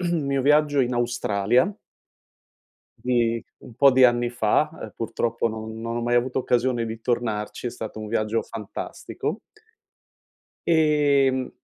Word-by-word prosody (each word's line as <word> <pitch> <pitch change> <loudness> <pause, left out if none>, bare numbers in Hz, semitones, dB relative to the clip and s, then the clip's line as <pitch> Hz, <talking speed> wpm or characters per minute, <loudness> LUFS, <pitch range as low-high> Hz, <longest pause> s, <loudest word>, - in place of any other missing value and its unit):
mio 140 -5 0
viaggio 150 0 +3
in 125 0 0
Australia 120 - +1 1.3
di 115 -2 +1 0.2
un 115 - -14
po' 140 +2 +6
di 130 0 +5
anni 120 -1 +4
fa, 120 +5 +1
ehm, - - -8
purtroppo 115 0 -1
non 110 0 -6
non 115 +1 -4
ho 120 - -2
mai 120 +1 +1
avuto 125 +2 +1
occasione 125 -1 +1
di 110 0 -6
tornarci, 115 -1 -2
è - - -2
stato 110 -2 -7
un 110 - -6
viaggio 110 0 0
fantastico. 105 -3 -6 1.3
Ehm, 145 -5 +3
120 Hz, 135 wpm, -24 LUFS, 115-130 Hz, 1.3 s, po